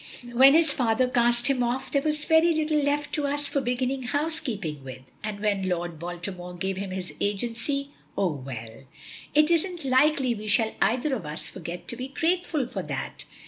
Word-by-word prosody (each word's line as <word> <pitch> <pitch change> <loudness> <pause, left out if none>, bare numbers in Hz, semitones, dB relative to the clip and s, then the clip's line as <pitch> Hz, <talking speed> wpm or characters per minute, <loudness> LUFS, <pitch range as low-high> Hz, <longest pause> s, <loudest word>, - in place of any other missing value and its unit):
When 265 +4 +7
his 320 -3 +5
father 245 0 +2
cast 240 -1 +3
him 270 -3 +2
off 245 +2 -1
there 280 - +2
was 300 0 0
very 320 +1 +4
little 310 -1 +1
left 290 +1 -1
to 295 -2 0
us 290 +1 0
for 280 - 0
beginning 255 +1 -1
housekeeping 245 - -2
with, 130 -1 -9 0.2
and 210 -1 -4
when 200 -3 0
Lord 175 -2 -3
Baltimore 175 +1 -6
gave 190 +2 -2
him 195 0 -4
his 185 -1 -5
agency 240 +7 -1 0.3
Oh, 190 -4 +2
well! 130 -4 -7 0.5
it 305 +2 +5
isn't 340 -1 0
likely 265 -1 +3
we 215 -1 -7
shall 220 +1 +2
either 250 +7 +2
of 205 -12 -3
us 150 +2 -3
forget 175 -1 -7
to - - -4
be 255 +2 -5
grateful 325 0 0
for 245 - -4
that. - - -4
245 Hz, 185 wpm, -26 LUFS, 190-285 Hz, 0.5 s, When